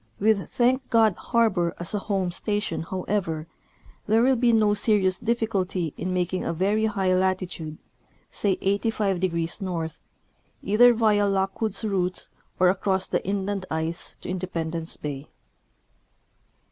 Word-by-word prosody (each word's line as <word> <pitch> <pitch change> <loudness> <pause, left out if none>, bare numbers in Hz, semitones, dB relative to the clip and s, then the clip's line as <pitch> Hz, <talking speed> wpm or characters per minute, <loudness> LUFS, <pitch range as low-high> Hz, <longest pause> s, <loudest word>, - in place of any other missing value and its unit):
AVith 200 -5 +2
Thank 255 +2 +1
God 225 -3 +4
harbor 210 -8 +1
as 175 +3 -4
a 205 - 0
home 195 -3 -1
station, 205 -1 -1
however, 185 -4 -2 0.6
there 220 +2 +4
will 265 +1 +4
be 240 0 +3
no 215 -2 +4
serious 200 -3 +2
diflficulty 200 -8 -1
in 185 - -3
making 180 0 -1
a - - -2
very 200 +6 +1
high 195 -4 +1
latitude, 185 -4 -1 0.5
say 200 -3 0
85° 195 -4 0 0.2
N., 160 - -3 0.7
either 230 +5 +6
via 210 -2 +3
Lockwood's 195 +3 -1
route 185 -3 -1 0.3
or 180 0 +5
across 190 0 0
the - - -1
inland 195 0 -2
ice 160 +2 -2
to - - -8
Independence 170 -3 -3
bay. 145 -1 -6
195 Hz, 130 wpm, -25 LUFS, 180-215 Hz, 0.7 s, either